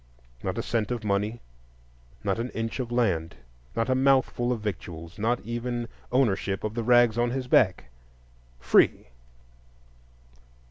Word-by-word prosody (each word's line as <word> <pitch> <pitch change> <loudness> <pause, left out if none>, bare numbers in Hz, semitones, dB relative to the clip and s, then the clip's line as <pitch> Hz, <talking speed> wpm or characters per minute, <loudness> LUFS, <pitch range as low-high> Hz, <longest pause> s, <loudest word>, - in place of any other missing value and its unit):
Not - - -3
a - - -1
cent 115 -3 -1
of 120 -2 -3
money, 105 +3 -1 0.8
not 100 +2 0
an 120 +2 -2
inch 115 +3 -3
of 120 -2 -3
land, 90 - 0 0.4
not 115 - 0
a 130 - +2
mouthful 130 -2 +2
of 120 - -1
victuals,—not 100 +3 -3
even 120 +1 -3 0.2
ownership 100 -6 +1
of 110 0 -2
the 120 - -2
rags 120 -1 +4
on 120 0 +2
his 130 +1 -3
back. 95 - +3 0.7
Free! - - +3
115 Hz, 135 wpm, -27 LUFS, 105-120 Hz, 0.8 s, rags